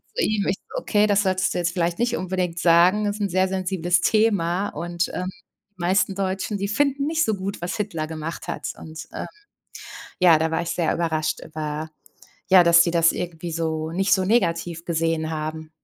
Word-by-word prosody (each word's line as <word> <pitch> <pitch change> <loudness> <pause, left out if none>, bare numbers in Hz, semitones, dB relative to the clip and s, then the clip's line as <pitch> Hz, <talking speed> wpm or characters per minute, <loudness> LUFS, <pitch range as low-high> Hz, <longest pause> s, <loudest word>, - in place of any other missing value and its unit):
zu 485 - +1
ihm 210 -2 0
ich 190 - +1
so: - - -6
„Okay, 210 - +2
das 205 0 +3
solltest 185 0 +1
du - - -3
jetzt 170 0 0
vielleicht 170 +1 -1
nicht 240 0 +1
unbedingt 180 -2 -2
sagen, 175 +5 +4
ist 205 +1 -2
'n 200 - 0
sehr 185 +1 +2
sensibles 180 -2 0
Thema. 200 -4 +2
Und, 170 +2 -3
ähm, 185 +1 -3 0.5
meisten 185 +2 +1
Deutschen, 195 +2 -2
die 200 - -1
finden 280 +5 0
nicht 320 +1 +1
so 220 - +1
gut, 195 +1 -5
was 175 - -3
Hitler 195 -7 -3
gemacht 160 +1 -6
hat.“ - - -4
Und, 160 0 -9
ähm, - - -4 0.9
ja, 175 -4 +6
da 160 +1 0
war 165 - 0
ich 170 - -4
sehr 170 -2 0
überrascht 160 -2 -1
über 155 0 -5 0.6
ja, 185 -1 +8
dass 170 0 +7
sie 170 - 0
das 165 -1 +4
irgendwie 170 -1 -5
so 160 -1 -2
nicht 195 +4 0
so 190 -1 0
negativ 170 -5 0
gesehen 165 -1 0
haben. 155 0 -5
175 Hz, 195 wpm, -23 LUFS, 165-195 Hz, 0.9 s, ja